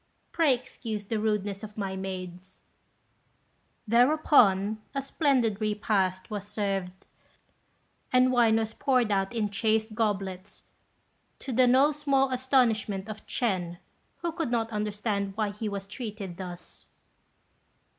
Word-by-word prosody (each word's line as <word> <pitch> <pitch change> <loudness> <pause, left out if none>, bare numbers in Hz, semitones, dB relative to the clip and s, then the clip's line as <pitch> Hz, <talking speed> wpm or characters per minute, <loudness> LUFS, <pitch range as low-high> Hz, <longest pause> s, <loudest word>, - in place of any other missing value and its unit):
Pray 310 -6 +3
excuse 225 -4 -6
the 220 +2 -2
rudeness 205 -2 -1
of 215 -1 -9
my 195 -2 -3
maids." 185 -1 -7 1.2
Thereupon 230 -5 +4
a 275 - 0
splendid 255 -8 +1
repast 205 -2 0
was 205 -1 -4
served, 195 -3 -3 1.1
and 255 0 +4
wine 235 -3 +4
was 225 0 -1
poured 250 -5 +1
out 195 -1 +1
in 220 -4 -1
chased 220 +1 0
goblets, 200 -3 -3 0.7
to 270 - -6
the 250 +2 +5
no 265 +4 +5
small 275 -2 +1
astonishment 230 -6 +1
of 215 0 -8
Ch'ên, 180 -7 -1 0.5
who 340 - 0
could 330 -5 -3
not 230 -1 0
understand 210 -1 -2
why 215 -2 0
he 210 +1 -4
was 200 -1 -5
treated 205 -4 -6
thus. 180 -2 -9
215 Hz, 125 wpm, -28 LUFS, 195-245 Hz, 1.2 s, the